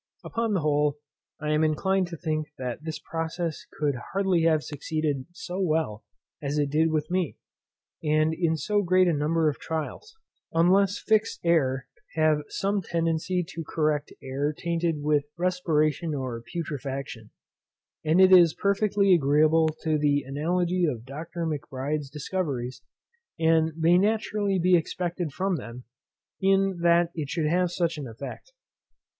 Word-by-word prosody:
Upon 230 -2 -1
the 185 - +1
whole, 150 -1 +1 0.4
I 150 0 -2
am 155 +1 +2
inclined 185 +4 +1
to 170 -1 -7
think 155 -2 -2
that 125 +3 -5
this 160 -1 -4
process 165 0 -4
could 150 -2 -1 0.2
hardly 190 -3 +2
have 155 -2 +3
succeeded 145 -2 -3
so 175 +1 -6
well 155 - 0 0.4
as 145 0 -2
it 145 -2 0
did 160 +2 +3
with 155 0 -1
me, 180 -4 -1 0.7
and 155 +1 +2
in 160 -1 0
so 205 +5 +1
great 185 0 +3
a 170 - +3
number 155 +2 +1
of 150 - -1
trials, 160 - -5 0.4
unless 190 +4 +4
fixed 220 -1 +1
air 135 -6 +2 0.3
have 155 -2 +3
some 200 +1 -1
tendency 165 +1 -1
to 165 - -6
correct 150 -1 -1
air 140 +3 -1
tainted 165 -2 -2
with 150 -1 +2
respiration 165 -3 0
or 130 -4 -4
putrefaction; 135 -8 -5 0.7
and 160 +3 +3
it 190 0 +7
is 175 -3 +7
perfectly 200 -1 +2
agreeable 155 +1 +4 0.2
to 155 -1 +1
the 145 -1 +2
analogy 175 +6 0
of 125 -8 -1
Dr. 160 +5 -5
Macbride's 145 -1 -3
discoveries, 140 -4 -3 0.6
and 160 0 +3
may 170 +2 +4
naturally 210 -1 +1
be 180 +1 +4
expected 175 -1 -2
from 185 +4 -1
them, 120 0 -8 0.6
that 175 -3 +3
it 150 -4 -4
should 165 0 -1
have 180 +3 +2
such 170 -2 -1
an 140 - -5
effect. 135 - -9
160 Hz, 145 wpm, -26 LUFS, 150-180 Hz, 0.7 s, it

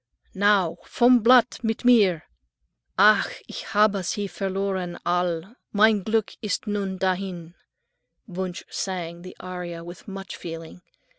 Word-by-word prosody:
"Now, 195 -4 +2
vom 245 +1 +5
blatt, 245 +1 +5
mit 225 +2 -2
mir." 200 -10 +5 0.7
"Ach, - - +5 0.2
ich - - -7
habe 210 -1 +4
sie 190 +4 -2
verloren, 190 -1 -3
All' 175 +3 -1 0.2
mein 215 0 +4
Glück 220 0 0
ist 210 -1 -2
nun 200 -3 -2
dahin." 185 -3 -2 0.7
Wunsch 185 -3 -5
sang 175 -3 -4
the 185 +1 -11
aria 180 -2 -6
with 175 +3 -11
much 195 -1 -7
feeling. 165 0 -8
190 Hz, 125 wpm, -24 LUFS, 175-210 Hz, 0.7 s, vom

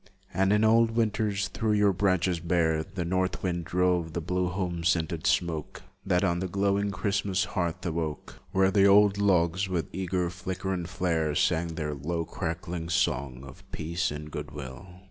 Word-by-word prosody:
And 95 +2 +2
in 105 +1 +3
old 115 +1 +5
winters, 110 -3 0
through 110 -1 0
your 105 -1 +4
branches 95 -2 +1
bare, 80 -2 +1
The 95 0 -5
north 95 +1 -1
wind 85 -2 -1
drove 90 -3 +1
the 85 - -1
blue 90 +2 -1
home 90 -2 -3
scented 85 0 0
smoke 85 -4 -1 0.2
That 90 -2 +1
on 85 -2 +1
the 95 - -2
glowing 100 +2 +1
Christmas 100 -2 0
hearth 85 0 -3
awoke 80 -3 -4
Where 95 0 +3
the 100 0 +5
old 100 0 +5
logs, 95 -1 +2
with 85 -5 -2
eager 90 -1 -1
flicker 95 +1 -4
and 90 -1 -4
flare, 80 -5 0
Sang 85 0 +1
their 75 -2 -3
low 85 +4 -3
crackling 85 -1 -4
song 65 -7 0
Of 70 -1 -12
peace 85 +2 -2
and 75 +1 -6
of 75 - -11
good - - -5
will. 70 +5 -8
90 Hz, 175 wpm, -28 LUFS, 85-95 Hz, 0.2 s, old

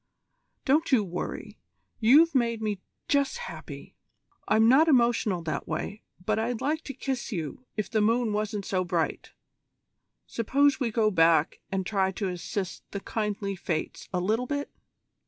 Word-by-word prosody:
Don't 300 +4 +2
you 240 -5 +5
worry. 180 -2 -5 0.4
You've 295 +9 +6
made 235 -4 +1
me 210 -3 -2 0.3
just 280 - +1
happy. 485 0 -9 0.5
I'm 220 +1 +4
not 275 +7 +6
emotional 235 - +3
that 155 - -3
way, 200 +6 -4 0.2
but 215 0 +1
I'd 230 +1 -1
like 315 +3 -1
to 275 - -6
kiss 265 -3 -3
you 180 - -5
if 215 - -1
the 220 -2 +1
moon 225 +1 +2
wasn't 210 -1 -2
so 185 -1 0
bright. 175 -3 -2 0.9
Suppose 275 +5 +2
we 250 -4 0
go 220 -1 +2
back 165 -3 +3
and 190 -1 -1
try 190 -2 +1
to 195 0 -2
assist 185 +1 -4
the 200 - -4
kindly 205 -1 -3
Fates 165 -3 -4
a 180 - 0
little 220 +7 0
bit?" 285 +1 -3
215 Hz, 155 wpm, -27 LUFS, 190-255 Hz, 0.9 s, You've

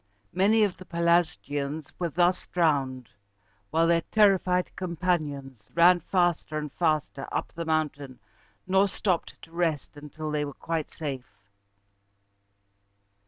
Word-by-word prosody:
Many 205 +5 +4
of 200 -3 0
the 185 - -12
Pelasgians 160 -4 0
were 175 -2 -1
thus 175 +3 +1
drowned, 135 -7 0 0.6
while 165 +2 +2
their 165 0 +3
terrified 190 -3 +2
companions 150 - -3
ran 175 +1 +6
faster 175 -3 0
and 150 -2 -4
faster 155 -4 -1
up - - -3
the 170 0 -5
mountain, 150 -4 -2 0.5
nor 190 +2 +3
stopped 185 -2 -2
to 165 - -13
rest 165 -4 -1
until 150 +1 -7
they 150 -1 0
were 145 -1 -5
quite 165 -2 -3
safe. 135 -9 -6
165 Hz, 120 wpm, -27 LUFS, 145-180 Hz, 0.6 s, ran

